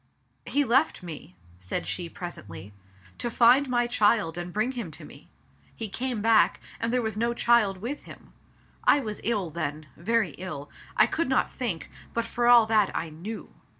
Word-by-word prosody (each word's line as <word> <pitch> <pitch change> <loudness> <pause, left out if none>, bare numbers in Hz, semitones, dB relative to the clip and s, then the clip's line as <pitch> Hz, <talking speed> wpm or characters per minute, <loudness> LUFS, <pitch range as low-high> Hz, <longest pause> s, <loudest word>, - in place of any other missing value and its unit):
"He 290 - +2
left 260 -3 +2
me," 155 - -8 0.2
said 90 0 -2
she 175 -2 -2
pres 175 +1 -6
ently 100 0 -10 0.2
— 90 -1 -25
"to 240 - -1
find 250 +4 +5
my 240 -1 +2
child 210 -7 +2
and 175 0 -5
bring 215 +6 0
him 235 -9 -5
to 155 - -10
me. - - -14 0.5
He 220 -2 -2
came 240 0 -3
back, 225 -1 +4 0.2
and 230 0 -1
there 250 -1 +1
was 220 -2 -2
no 235 +2 0
child 235 -5 +3
with 240 +10 -5
him. - - -13 0.5
I 290 - +5
was 215 -6 -5
ill 205 -8 -1
then 155 -1 -4
— - - -30
very 215 +1 0
ill. 175 -6 -6 0.3
I - - +7
could 325 -4 -1
not 265 - +2
think, 220 - -2 0.2
but 235 0 0
for 240 +1 0
all 240 -2 +8
that, 215 -2 +3
I 160 -1 -4
knew. 200 +8 -8
220 Hz, 190 wpm, -27 LUFS, 170-240 Hz, 0.5 s, all